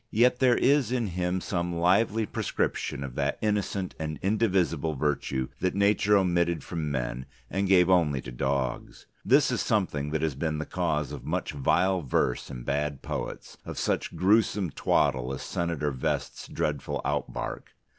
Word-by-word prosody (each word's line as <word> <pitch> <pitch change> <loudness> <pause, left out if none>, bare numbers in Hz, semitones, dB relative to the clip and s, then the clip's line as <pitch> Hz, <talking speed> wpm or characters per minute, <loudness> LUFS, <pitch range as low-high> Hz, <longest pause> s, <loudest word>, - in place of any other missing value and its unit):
Yet 125 +3 +3
there 125 -2 +4
is 140 -4 +3
in 125 -2 0
him 90 +1 -1
some 85 -2 -2
lively 100 +6 +2
prescription 70 - -2
of 65 -2 -6
that 70 +2 -1
innocent 105 -3 -1
and 75 -1 -3
indivisible 95 -7 +1
virtue 65 -2 -1
that 90 +1 0
Nature 100 +1 +4
omitted 85 -3 +1
from 80 -3 -3
men 65 -1 -3 0.2
and 95 +1 0
gave 90 -2 +5
only 85 -7 +3
to - - -8
Dogs. 65 0 -2 0.2
This - - +4
is - - 0
something 75 0 0
that 80 +1 -1
has 80 -3 +1
been 75 +3 -2
the 75 - -3
cause 80 -5 -1
of - - -7
much - - -2
vile 90 +7 +2
verse 65 -3 0
in - - -7
bad 70 0 -2
poets, - - -5
of - - -7
such - - -1
gruesome 100 -2 +2
twaddle 65 -3 +1
as - - -7
Senator 85 -4 -2
Vest's 65 -2 -3
dreadful 75 -3 -2
outbark. - - -3
85 Hz, 160 wpm, -27 LUFS, 70-95 Hz, 0.2 s, gave